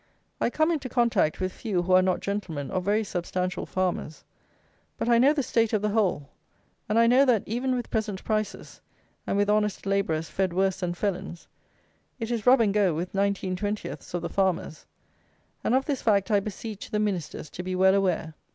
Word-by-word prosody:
I - - +1
come 315 +6 +1
into 285 -6 -2
contact 235 -10 +2
with 185 0 -2
few 195 -6 -2
who 185 +1 +1
are 185 - +7
not 185 -1 0
gentlemen 185 -9 -4
or 185 - 0
very 205 +4 +1
substantial 180 -1 -3
farmers; 180 -4 -2 0.7
but - - -2
I 235 -1 +5
know 270 +4 +6
the 295 -2 0
state 230 -2 +1
of 210 -1 +1
the 210 - +1
whole; 190 -10 +1 0.6
and 215 - +1
I 230 - +6
know 250 +4 +5
that, 245 -7 +3
even 255 +4 -1
with 245 -2 -4
present 210 -3 -2
prices, 215 -2 -3 0.5
and - - 0
with 205 0 +2
honest 210 -1 +1
labourers 195 -5 0
fed 190 -2 -1
worse 190 0 +1
than 175 -2 -2
felons, 185 -2 -4 0.7
it 225 0 -3
is 230 -2 -2
rub 255 0 +7
and 205 -3 +2
go 200 -6 +2
with 175 +3 -4
nineteen 195 -1 0
twentieths 205 -2 -4
of 175 - -3
the - - -1
farmers; 185 -5 -1 0.8
and 240 - +2
of 265 +1 +2
this 280 -3 -2
fact 205 -1 +2
I 205 - +5
beseech 210 +1 -7
the 210 - -1
ministers 185 -8 -3
to - - -6
be 185 0 -3
well 190 +1 +5
aware. 180 -5 0
200 Hz, 195 wpm, -26 LUFS, 185-225 Hz, 0.8 s, are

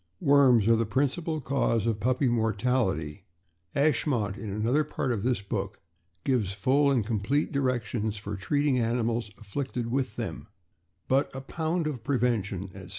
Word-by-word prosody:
Worms 130 -6 +5
are 115 - +6
the 115 -1 0
principal 145 - 0
cause 125 -5 +1
of 115 -2 0
puppy 130 +4 +1
mortality; 110 - 0 0.5
"Ashmont," 130 -8 +1
in 110 -1 -6
another 115 +9 +1
part 135 -3 -2
of 110 -4 -1
this 120 -2 0
book, 100 -1 -4 0.4
gives 115 -8 +1
full 135 +8 +3
and 125 -6 +2
com 110 -1 -1
plete 140 +9 0
directions 120 -6 -1
for 105 0 -5
treating 145 +7 +1
animals 115 -1 0
afflicted 120 +2 -4
with 130 -4 -1
them; 115 -3 -5 0.6
but 135 +2 +2
"a 135 - -4
pound 160 +4 -2
of 135 -7 -3
prevention," 115 -7 0
etc. 95 -2 -10
120 Hz, 155 wpm, -28 LUFS, 105-135 Hz, 0.6 s, are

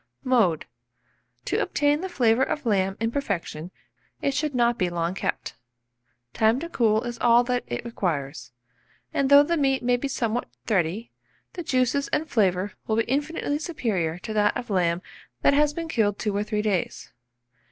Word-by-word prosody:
Mode. 225 - +2 0.8
To - - 0
obtain 290 +1 +1
the 380 - -4
flavour 245 -7 +2
of 290 +1 -1
lamb 195 -3 +1
in 225 +1 0
perfection, 180 - -3 0.5
it 280 - 0
should 295 -1 -1
not 240 -1 +2
be 180 - +1
long 170 0 -2
kept; 195 - -3 0.8
time 220 +3 +3
to 335 - -5
cool 220 -6 +2
is 240 -1 -5
all 240 0 +5
that 250 0 -1
it 120 - -4
requires; 145 - -3 0.6
and 275 -1 +1
though 285 0 +8
the 335 +3 0
meat 270 -3 +1
may 245 0 +2
be 280 - -3
somewhat 240 -3 -2 0.2
thready, 195 +2 -1 0.4
the 355 - -5
juices 260 -2 +1
and 315 - -1
flavour 200 -6 +1 0.2
will 220 - +1
be 225 - +2
infinitely 290 +3 -1
superior 200 - -2
to 215 +5 -6
that 210 -1 +2
of 240 - -6
lamb 175 -2 +1 0.4
that - - +5
has 295 +1 +3
been 330 +2 -5
killed 205 -9 +1
2 210 -2 -2
or 205 - 0
3 210 0 -2
days. 200 -5 -2
230 Hz, 175 wpm, -25 LUFS, 195-275 Hz, 0.8 s, though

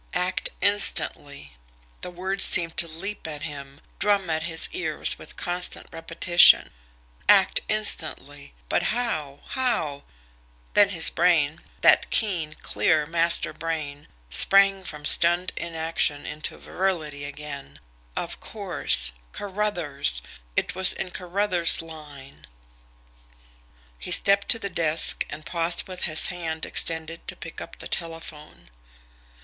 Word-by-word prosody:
"Act 180 +1 0
instantly!" 160 - +1 0.5
The - - -5
words 190 +2 -3
seemed 165 -1 +6
to 170 - +6
leap 180 +4 -7
at 150 -2 -6
him, 140 -1 -8 0.2
drum 200 -3 +1
at 160 0 0
his 160 0 -1
ears 160 -4 -1
with - - -13
constant 180 0 -2
repetition. 170 +1 +5 0.6
Act - - +5
instantly! 155 - 0
But - - +1 0.2
how? 155 - -3
How? 165 - -1 0.7
Then 205 -1 +6
his 170 -5 +1
brain 160 -4 +1 0.2
that - - +5
keen, 170 -8 +1
clear, 155 -4 +1
master 170 +1 +2
brain 150 -3 -5 0.2
sprang 195 - +4
from 150 -2 -8
stunned 175 +3 +2
inaction 160 -3 -1
into 155 +1 -5
virility 160 -7 -3
again. 145 -1 -8 0.4
Of - - -4
course - - 0 0.2
Carruthers! 175 - -2 0.3
It - - -1
was 190 +1 0
in 185 - -6
Carruthers' 180 -1 +2
line. 150 -4 -12 1.5
He - - -6
stepped 200 0 +3
to 230 - +3
the 210 - -4
desk 165 -4 0
and 155 - -8
paused 170 0 -1
with 185 -1 -4
his 155 -1 0
hand 165 -3 -4
extended 165 0 -1
to - - -5
pick - - -9
up - - -10
the - - -8
telephone. 165 - -7
165 Hz, 120 wpm, -24 LUFS, 150-185 Hz, 1.5 s, seemed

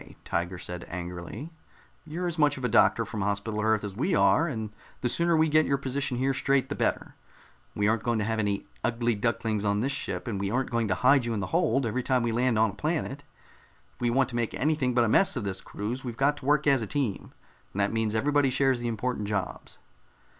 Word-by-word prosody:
Tiger 85 +2 -2
said 90 0 -6
angrily. 90 - -6 0.6
"You're 170 +4 -4
as 170 -2 -3
much 145 -1 +3
of 130 - -4
a - - +3
doctor 110 - +4
from 105 - -5
Hospital 100 +2 -1
Earth 110 -1 +2
as 100 -2 -5
we 160 - 0
are, 165 - +4
and 110 -7 -4 0.3
the 120 - 0
sooner 170 +4 +2
we 160 0 +4
get 155 0 +3
your 140 - +2
position 135 -1 -2
here 135 +2 +1
straight, 135 0 +1
the - - -2
better. - - -1 0.6
We 105 0 +1
aren't 110 +1 +2
going 120 0 0
to 105 - 0
have 110 0 -1
any 100 -2 -1 0.2
ugly 120 0 +1
ducklings 110 -1 -1
on 100 0 +1
this 135 +4 0
ship, 140 - -3
and 105 -4 -2
we 100 0 -1
aren't 130 +4 -1
going 115 -2 +1
to 95 - +1
hide 130 0 +4
you 115 -1 -1
in - - -1
the 100 - -2
hold 130 +3 +2
every 120 +3 -1
time 125 -1 +1
we 120 - 0
land 120 0 +1
on 110 -1 +3
a - - -15
planet. 150 -3 -2 0.7
If - - -27
we 120 - +2
want 130 +2 +2
to 120 - -6
make 120 -2 -1
anything 140 -4 0
but 120 - +4
a - - +2
mess 190 - +3
of 120 - -2
this 95 -1 -3
cruise, 115 +6 -5
we've 120 -3 -6
got 145 +2 +3
to 135 - -11
work 150 0 +3
as 140 -4 +4
a 110 - -3
team, 125 -5 -2 0.4
and 100 - -5
that 100 +2 +1
means 110 -1 0
everybody 145 +3 +2
shares 135 -1 +2
the 120 - -3
important 115 -1 -2
jobs." 100 -2 -4
120 Hz, 240 wpm, -27 LUFS, 105-135 Hz, 0.7 s, doctor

